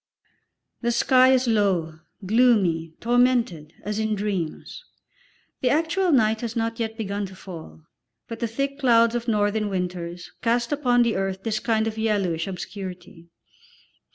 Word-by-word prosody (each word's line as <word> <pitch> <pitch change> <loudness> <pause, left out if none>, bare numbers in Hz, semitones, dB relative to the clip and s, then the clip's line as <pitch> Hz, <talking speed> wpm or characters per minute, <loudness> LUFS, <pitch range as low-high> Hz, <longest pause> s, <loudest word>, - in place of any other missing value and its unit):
The 240 -1 +1
sky 255 +2 +5
is 260 -1 +3
low, 185 -8 +1 0.3
gloomy, 190 -8 +2
tormented, 235 -10 +1
as 210 +2 -3
in 220 -1 0
dreams. 195 - -4 0.8
The 250 - +2
actual 330 +6 +1
night 220 -5 +3
has 230 -2 -4
not 230 0 -2
yet 225 -1 -3
begun 200 -2 -3
to 190 - -13
fall, 160 - -11 0.4
but 230 -1 -7
the 235 - -1
thick 275 +5 -3
clouds 235 -3 +4
of 240 0 -3
northern 210 -1 +1
winters 180 -2 -4
cast 235 +1 +1
upon 250 -4 +3
the 235 -1 0
earth 195 0 -2
this 215 -1 -1
kind 220 -1 +1
of 220 0 -4
yellowish 195 -7 0
obscurity. 180 -3 -8
220 Hz, 145 wpm, -24 LUFS, 185-240 Hz, 0.8 s, sky